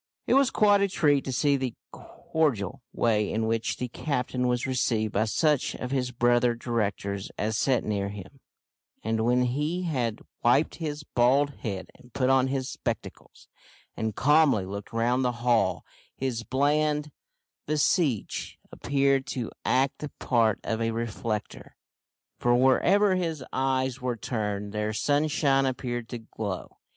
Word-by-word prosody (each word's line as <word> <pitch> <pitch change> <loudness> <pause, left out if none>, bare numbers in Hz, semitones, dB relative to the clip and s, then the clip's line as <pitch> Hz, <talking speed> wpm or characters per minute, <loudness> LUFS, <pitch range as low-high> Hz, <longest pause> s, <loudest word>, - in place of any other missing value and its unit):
It - - +2
was 275 -1 +5
quite 205 -4 +4
a 200 - +3
treat 145 -7 +2
to 130 - -3
see 140 +2 +2
the 130 -3 -3 0.2
cordial 130 - -2
way 105 -3 +1
in 110 +1 0
which 115 0 -1
the 125 - -3
captain 125 -1 -2
was 125 0 0
received 115 -5 0
by 105 +2 +2
such 150 +5 +1
of 125 - -5
his 130 -2 0
brother 120 0 +2
directors 100 -4 -2
as 110 +1 -1
sat 130 +3 +2
near 100 -2 -1
him, 100 +6 -10 0.6
and, 110 0 0
when 125 +2 +3
he 150 +8 -1
had 125 -10 -2 0.2
wiped 135 +6 +3
his 150 -2 -4
bald 135 +2 +2
head 100 -5 -5
and 125 - -20
put 130 -1 +2
on 135 0 +4
his 130 -1 -2
spectacles, - - -6 0.5
and 110 -2 -3
calmly 145 -8 +4
looked 100 +1 -7
round 120 +3 +1
the 125 -1 +1
hall, 115 -6 +2 0.3
his 130 -3 -2
bland 150 +5 +1 0.6
visage 150 - 0
appeared 140 0 +1
to 120 -4 -4
act 135 +2 +1
the 150 - -5
part 115 -4 +2
of 115 0 -2
a 115 - +1
reflector, 115 -1 -4 0.6
for, 120 0 +3
wherever 185 +11 +4
his 165 -6 -2
eyes 130 -1 0
were 125 -2 -2
turned, 105 -3 -3
there 105 0 -1
sunshine 145 +2 +2
appeared 120 -2 -3
to 120 - -4
glow. 110 -4 -6
125 Hz, 150 wpm, -27 LUFS, 115-140 Hz, 0.6 s, was